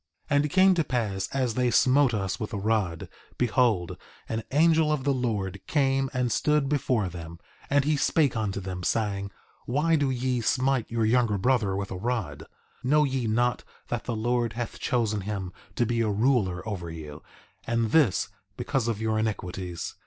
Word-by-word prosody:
3:29 - - +4
And 145 +1 +3
it - - -2
came 190 +4 +5
to 170 -3 +1
pass 105 -8 -2
as 130 -4 0
they 125 +1 +1
smote 130 +2 +4
us 95 -4 -2
with 110 +2 -5
a - - -1
rod, 100 -5 -1 0.3
behold, 115 -7 +1 0.3
an 110 0 -2
angel 160 +1 +4
of 150 -3 0
the 140 0 +2
Lord 100 -7 -2
came 135 -2 +1
and 125 -2 -1
stood 150 +1 +2
before 130 -7 +1
them, 85 -1 -8 0.3
and 140 -1 +3
he 150 0 +2
spake 145 -2 +2
unto 105 -3 -2
them, 90 -1 -5
saying: 100 0 -1 0.4
Why 150 +6 +2
do 145 -3 +1
ye 125 -1 -1
smite 130 +1 +1
your 115 -1 0
younger 115 -2 +2
brother 110 -3 +1
with 100 0 -4
a 95 - -4
rod? 105 - -3 0.4
Know 150 +4 +4
ye 130 -4 -1
not 120 +3 +1 0.3
that 120 -2 -3
the 120 - -2
Lord 120 +1 0
hath 120 +1 -5
chosen 110 -5 0
him 95 -2 -4 0.2
to 120 - +2
be 115 0 0
a 110 - +1
ruler 105 -4 +1
over 90 -6 -4
you, 80 -2 -8 0.5
and 115 -2 0
this 145 - +3 0.3
because 135 -5 -1
of 115 -3 -1
your 110 -1 0
iniquities? 95 -5 -3
115 Hz, 180 wpm, -27 LUFS, 100-130 Hz, 0.5 s, came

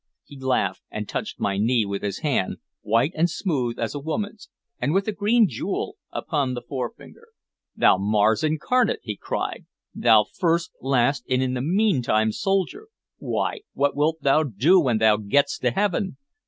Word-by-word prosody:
He 140 -2 -13
laughed, 125 -8 0
and 105 -1 -5
touched - - -5
my 100 -1 -1
knee 115 +1 +2
with 100 0 -4
his 100 -2 -4
hand, 135 -11 0 0.2
white 115 +8 +2
and 170 +2 +1
smooth 135 - -2
as 115 - -2
a 145 - -4
woman's, 205 +8 -4 0.3
and 150 - 0
with 195 +2 +1
a - - +1
green 215 +2 +3
jewel 120 - -4 0.2
upon 140 -5 -1
the 120 - -6
forefinger. 150 - -7 0.5
"Thou 95 - +4
Mars 105 +4 +2
incarnate!" 160 +11 +1
he 105 - -4
cried. - - -4 0.3
"Thou 110 -3 +5
first, 170 - -1
last, 135 0 +1
and 130 0 +2
in 130 -1 -1
the 125 - -2
meantime 135 - +2
soldier! 195 - -1 0.3
Why, - - -2
what 140 0 +1
wilt 155 +1 0
thou 140 +3 +4
do 145 - +3
when 125 -9 +2
thou 110 -1 +4
gettest 140 - +1
to - - +2
heaven? 195 -1 -1
140 Hz, 170 wpm, -24 LUFS, 110-175 Hz, 0.5 s, Thou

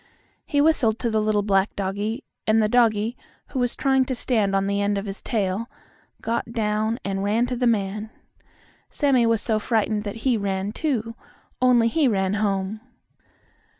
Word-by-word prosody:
He 290 -4 +2
whistled 275 -8 +3
to 235 -1 -1
the 220 0 +1
little 210 -1 +1
black 195 -1 +1
doggie, 205 +6 -3 0.2
and 220 +1 +4
the 215 - +3
doggie, 225 -1 +2 0.3
who 265 - -3
was 245 -1 0
trying 265 -1 +2
to 260 - -2
stand 215 -5 0
on 195 0 +1
the 200 0 0
end 200 0 +1
of 200 - -3
his 195 0 -6
tail, 210 0 -2 0.5
got 230 0 -2
down 215 0 0
and 195 0 -2
ran 215 +4 +2
to 250 0 -3
the 245 0 +1
man. 210 -1 -1 0.8
Sammie 265 -5 +2
was 230 -2 +1
so 220 -2 +1
frightened 215 -1 0
that 205 - -4
he 250 -3 +3
ran, 195 -1 -2
too, 230 -4 -2 0.5
only 245 -2 +5
he 290 +4 +2
ran 195 -4 +1
home. 200 +1 -1
220 Hz, 175 wpm, -24 LUFS, 200-240 Hz, 0.8 s, only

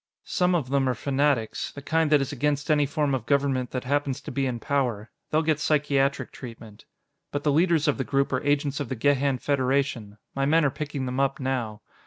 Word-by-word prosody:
Some 180 0 +1
of 135 -7 -2
them 135 -2 +2
are 125 - 0
fanatics 140 -2 0
the 140 - -10
kind 160 +1 +1
that 150 -2 +5
is 135 - -2
against 145 +2 0
any 150 -2 +3
form 145 -1 0
of 125 -4 -2
government 135 -3 +1
that 125 - -4
happens 140 0 -1
to - - -7
be 135 -1 0
in 120 -2 -3
power; 120 -5 -1 0.2
they'll 155 +1 +2
get 155 -2 +1
psychiatric 140 -2 +1
treatment. 115 -4 -11 0.5
But 145 0 -3
the 150 - +2
leaders 165 0 +3
of 145 - +1
the - - +1
group 140 +1 0
are 130 - +1
agents 145 0 0
of 140 -5 -4
the 130 - -2
Gehan 140 +2 +2
Federation. 130 -6 0 0.2
My 135 0 0
men 160 +1 +4
are 140 - +2
picking 145 -1 -4
them 130 +1 -3
up 135 0 +1
now. 120 -5 -3
140 Hz, 215 wpm, -26 LUFS, 130-145 Hz, 0.5 s, that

